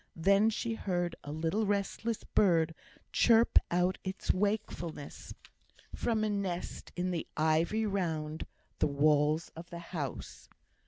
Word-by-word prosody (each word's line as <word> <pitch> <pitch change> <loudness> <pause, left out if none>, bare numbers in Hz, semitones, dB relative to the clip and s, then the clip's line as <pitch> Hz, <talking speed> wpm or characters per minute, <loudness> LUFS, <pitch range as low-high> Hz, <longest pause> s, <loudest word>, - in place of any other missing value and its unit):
Then 200 +6 +4
she 230 +1 -2
heard 175 -5 -1
a 145 - -6
little 165 +8 0
restless 205 +3 -1
bird 165 -5 +3 0.4
chirp 230 0 +5
out 180 +2 +1
its 190 +1 -1
wakefulness 185 -7 -3 0.6
from 225 -2 0
a 215 - +1
nest 190 -3 -3
in 180 +1 -1
the 170 -2 -3
ivy 160 +8 +2
round 160 -6 -2 0.3
the - - +3
walls 150 +2 +2
of 170 +2 -9
the 170 - -7 0.2
house. 145 -7 -5
175 Hz, 125 wpm, -32 LUFS, 160-205 Hz, 0.6 s, chirp